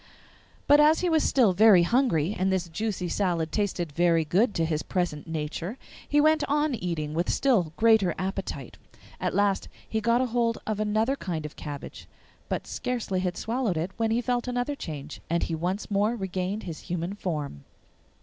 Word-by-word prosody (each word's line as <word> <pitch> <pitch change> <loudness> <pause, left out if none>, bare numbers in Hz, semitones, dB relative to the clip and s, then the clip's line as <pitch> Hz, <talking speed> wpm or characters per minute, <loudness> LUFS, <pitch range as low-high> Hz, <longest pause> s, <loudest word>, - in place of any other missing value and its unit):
But 290 +1 +6
as 305 +2 +5
he 360 - +1
was 320 -2 +3
still 235 -8 +4
very 200 -2 +7
hungry 205 - +2
and 190 +1 +1
this 185 -2 0
juicy 195 0 -2
salad 170 -4 0
tasted 185 -6 -1
very 165 +1 +2
good 200 +8 +2
to 165 - +1
his 155 -1 -1
present 170 -3 -2
nature, 165 - -4 0.3
he 295 - +3
went 310 +1 +4
on 295 0 +2
eating 165 -8 -3
with 170 +2 0
a - - +1
still 215 - +2
greater 220 -6 +4
appetite. 185 - -4 0.4
At - - -1
last 200 -1 +1 0.2
he 220 - -1
got 235 +3 +2
hold 230 -1 +1
of 215 -1 -2
another 215 +5 +1
kind 165 - -4
of 150 - -8
cabbage, 145 -2 -8 0.4
but - - -2
scarcely 235 -7 -2
had 180 -1 -2
swallowed 230 -6 -1
it 170 +4 -2
when 225 -1 +1
he 230 +2 +1
felt 245 0 -1
another 245 +3 -1
change, 150 - -7
and 170 +1 +1
he - - -2
once 180 +6 -2
more 205 +4 +2
regained 190 0 -3
his 165 -4 -6
human 175 +2 -2
form. 150 - -4
190 Hz, 180 wpm, -27 LUFS, 170-230 Hz, 0.4 s, very